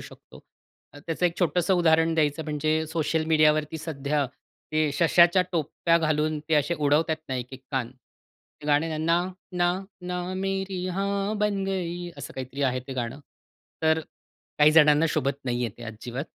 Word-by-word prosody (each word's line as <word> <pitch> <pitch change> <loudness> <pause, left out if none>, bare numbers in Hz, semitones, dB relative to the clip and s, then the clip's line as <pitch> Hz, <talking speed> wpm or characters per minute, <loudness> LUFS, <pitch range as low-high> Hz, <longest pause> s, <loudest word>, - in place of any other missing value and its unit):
शकतो. - - -14 0.5
त्याचं 165 +4 -1
एक 170 - -4
छोटसं 180 +1 +2
उदाहरण 165 -1 +3
द्यायचं 155 0 +1
म्हणजे, 155 +1 0
सोशल 160 0 -1
मीडिया 155 -1 +5
वरती 155 +1 -3
सध्या 145 -2 -1 0.5
ते 155 -1 +2
सश्याच्या 170 +3 +5
टोप्या 165 +1 +1
घालून 155 -1 0
ते 160 - +3
असे 150 +4 +2
उडवतात 155 +1 +2
ना, 130 - -2
एक-एक 125 +1 -6
कान, 130 -4 -2
ते 140 +3 -20
गाणं 150 +2 +3
आहे 160 -1 -3
ना, 165 +2 +2
ना, 185 - -6 0.2
ना, 175 0 +2 0.3
ना, 180 0 -2
ना 185 - -4
मेरी 190 -1 -2
हाँ 200 +3 -1
बन 205 -2 0
गयी. 175 -2 -3
असं 140 - -8
काहीतरी 130 +2 -5
आहे 130 -1 +1
ते 135 - -4
गाणं. 125 +3 -4 0.6
तर 160 0 +3 0.6
काही 150 +1 +6
जणांना 150 0 +6
शोभत 140 -1 -1
नाही 120 -1 -1
आहे 115 -2 -5
ते - - -9
अजिबात. 120 +5 -6
155 Hz, 170 wpm, -26 LUFS, 145-175 Hz, 0.6 s, काही